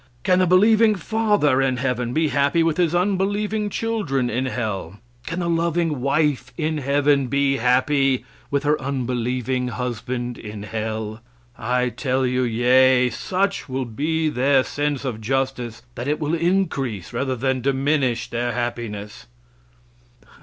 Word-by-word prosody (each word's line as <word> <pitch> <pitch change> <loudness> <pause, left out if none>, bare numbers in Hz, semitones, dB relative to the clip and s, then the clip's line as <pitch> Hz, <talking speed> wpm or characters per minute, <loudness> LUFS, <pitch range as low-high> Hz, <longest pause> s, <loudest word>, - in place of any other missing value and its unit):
Can 185 -1 +3
the 185 - +3
believing 215 +4 +5
father 205 -8 +2
in 130 -2 +1
heaven 125 -2 -1
be 155 +3 +1
happy 145 +4 +2
with 165 -1 +1
his 175 -2 +2
unbelieving 205 +3 0
children 190 - -1
in 130 +4 -1
hell? 105 -7 -4 0.3
Can 170 +2 -3
the 170 - -1
loving 165 -3 0
wife 140 -2 +1
in 155 -2 -1
heaven 140 0 +2
be 140 +1 +1
happy 130 +1 +2 0.2
with 140 0 0
her 150 0 +1
unbelieving 125 -1 -1
husband 120 0 -4
in 105 -2 -7
hell? 110 0 -4 0.3
I 125 +2 0
tell 130 +1 -1
you 125 0 +1
yea. 125 +1 +4
Such 190 - -2
will 130 0 -2
be 155 +7 -1
their 135 -1 +3
sense 145 -1 -2
of 115 -4 -3
justice 125 -1 -2
that 120 +2 -5
it 150 +1 0
will 155 0 -1
increase 160 - -1
rather 130 +2 -1
than 130 +1 -1
diminish 135 -3 +1
their 120 0 -2
happiness." 115 - -5
135 Hz, 140 wpm, -22 LUFS, 125-155 Hz, 0.3 s, believing